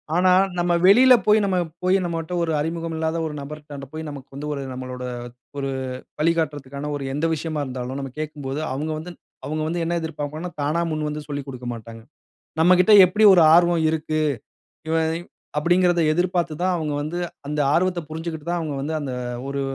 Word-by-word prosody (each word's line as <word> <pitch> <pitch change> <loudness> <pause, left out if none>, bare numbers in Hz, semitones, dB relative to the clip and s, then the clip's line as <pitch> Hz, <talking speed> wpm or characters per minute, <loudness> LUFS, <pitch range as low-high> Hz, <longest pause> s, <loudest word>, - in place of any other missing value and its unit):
ஆனா, 180 +1 +4 0.3
நம்ம 175 0 +1
வெளியில 250 +6 +8
போய் 215 +1 +5
நம்ம 185 -2 +1 0.3
போய் 185 +1 +3
நம்மகிட்ட 165 0 -3
ஒரு 165 - -1
அறிமுகம் 165 +1 -3
இல்லாத 160 +1 -1
ஒரு 155 - -4
நபரிடம் 145 -1 -8
போய் 160 0 -5
நமக்கு 140 -2 -9
வந்து 150 +2 -5
ஒரு 140 - -4
நம்மளோட 125 0 -6 0.5
ஒரு 135 -1 -2 0.5
வழிகாட்டுறக்கான 150 -3 -1
ஒரு 140 - -4
எந்த 150 +3 -1
விஷயமா 155 -1 -3
இருந்தாலும், 130 +1 -5
நம்ம 135 -1 -5
கேட்கும்போது 145 -2 -4
அவுங்க 155 +3 -3
வந்து 165 +3 -7 0.3
அவங்க 155 +2 -2
வந்து 170 +1 -2
என்ன 170 +1 0
எதிர்ப்ப்பாங்கன்னா, 160 +2 -5
தானா 155 +4 +1
முன்வந்து 150 -1 -3
சொல்லிக் 145 -1 -5
கொடுக்க 125 -1 -8
மாட்டாங்க. 115 0 -10 0.6
நம்மக்கிட்ட 180 +4 +5
எப்பிடி 210 +4 +2
ஒரு 170 - +6
ஆர்வம் 170 -1 +4
இருக்கு. 155 0 -1 0.7
இவன் 160 0 +1 0.5
அப்பிடிங்கிறத 175 +2 +3
எதிர்பார்த்து 175 0 0
தான் 185 0 +2
அவுங்க 155 -3 -2
வந்து 155 +4 -4 0.3
அந்த 150 0 -2
ஆர்வத்த 180 0 +2
புரிஞ்சுக்கிட்டு 160 -1 -5
தான், 175 0 0
அவுங்க 155 -3 -3
வந்து 155 +3 -3
அந்த 140 -3 -4 0.4
ஒரு 140 0 -2
160 Hz, 165 wpm, -23 LUFS, 145-175 Hz, 0.7 s, வெளியில